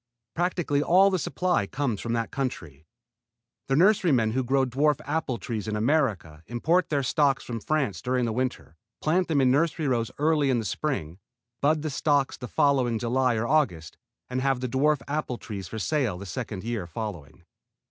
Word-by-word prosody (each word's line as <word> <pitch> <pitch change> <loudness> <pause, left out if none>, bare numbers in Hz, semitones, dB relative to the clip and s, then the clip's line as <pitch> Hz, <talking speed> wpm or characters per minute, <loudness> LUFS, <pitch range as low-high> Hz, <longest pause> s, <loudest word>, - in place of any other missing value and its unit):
Practically 175 -5 0
all 190 +5 +5
the 185 - +1
supply 145 - 0
comes 125 -6 -2
from 115 - -2
that 115 -1 -2
country. 80 - -5 0.8
The 135 - +1
nurserymen 160 - +4
who 130 +3 0
grow 135 +2 +2
dwarf 140 +3 +1
apple 145 -4 -1
trees 110 -1 -5
in 110 - -2
America 105 - 0
import 165 +10 +1
their 145 -3 0
stocks 140 0 +2
from 115 -2 -5
France 140 -3 -1
during 125 -1 0
the 115 - -1
winter, 125 -9 -3 0.2
plant 175 +4 +1
them 155 -3 +1
in 130 -1 +4
nursery 155 +2 +1
rows 115 -4 0
early 150 -1 +2
in 130 - +2
the 115 - -2
spring, 95 - -3 0.4
bud 155 +1 +2
the 155 - -2
stocks 145 -1 +1
the 125 - -8
following 130 -4 +2
July 125 +2 +1
or 110 +1 -1
August, 115 - 0 0.3
and 125 0 -2
have 135 -1 +1
the 130 - -2
dwarf 140 +3 +1
apple 145 -4 -2
trees 100 -6 -7
for 110 - -7
sale 120 - 0
the 100 - -8
second 105 0 -5
year 115 -6 -3
following. 85 -5 -7
130 Hz, 180 wpm, -26 LUFS, 110-150 Hz, 0.8 s, all